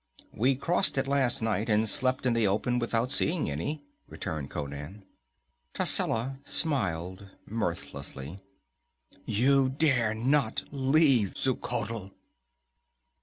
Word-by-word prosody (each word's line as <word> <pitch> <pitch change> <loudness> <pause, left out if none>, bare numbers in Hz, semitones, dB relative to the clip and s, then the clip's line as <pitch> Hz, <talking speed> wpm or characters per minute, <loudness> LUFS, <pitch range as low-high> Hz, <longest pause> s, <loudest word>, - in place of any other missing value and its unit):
"We 130 +5 +2
crossed 170 +4 +2
it 135 0 +1
last 135 -4 +2
night, 110 0 0
and 110 +1 +3
slept 130 +4 0
in 125 - +3
the 115 -3 +2
open 120 +5 0
without 120 +1 0
seeing 155 - +1
any," 145 - -4 0.3
returned 75 -3 -5
Conan. 75 +7 -7 0.7
Tascela 130 +4 +1
smiled 95 - 0 0.2
mirthlessly. 90 -6 -5 0.9
"You 130 +5 +3
dare 130 -6 +1
not 125 +1 +1
leave 135 - +3
Xuchotl!" 115 -5 -3
115 Hz, 105 wpm, -28 LUFS, 100-135 Hz, 0.9 s, and